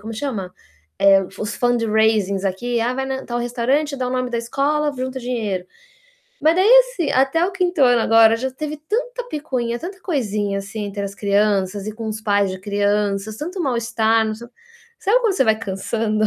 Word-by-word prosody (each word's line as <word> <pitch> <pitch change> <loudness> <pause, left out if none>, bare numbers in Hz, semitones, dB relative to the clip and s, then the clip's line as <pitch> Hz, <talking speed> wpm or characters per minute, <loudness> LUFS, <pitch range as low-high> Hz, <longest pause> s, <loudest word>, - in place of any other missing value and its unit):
como 225 +1 -7
chama? 215 -8 -4 0.5
Eh, 195 -1 +5 0.2
Os 215 - -4
fundraising 220 -4 +2
aqui 235 +6 -2
ah, 240 +2 0
vai 265 0 -3
tal 240 0 -2
restaurante, 255 +5 0
dar 255 -1 -2
o - - -4
nome 255 -1 -1
da 235 - -1
escola, 290 +5 0
junta 260 +1 -4
dinheiro. 220 -7 -3 0.8
Mas 320 +3 +4
aí, 380 +3 +4
assim, - - -2
até 270 +6 +2
o 390 - -4
5º 360 -4 -1
ano 245 -2 +5
agora 225 0 +5
já 260 +3 -3
teve 305 +3 -5
tanta 470 +11 -3
picuinha, 250 -6 -2
tanta 370 +7 -7
coisinha, 210 - -1
assim, 205 +2 -5
entre 200 0 -5
as 200 0 -6
crianças 200 -1 0
e 215 - -3
com 225 0 -6
os 215 0 -4
pais 205 -2 +1
de 185 - -6
crianças, 205 +1 -1
tanto 360 +5 -5
mal-estar. 230 -4 +1 0.7
Sabe, 450 +3 +2
quando 450 -4 +2
você 265 - +2
vai 220 -2 +2
cansando? 215 +2 -1
235 Hz, 175 wpm, -20 LUFS, 210-280 Hz, 0.8 s, Eh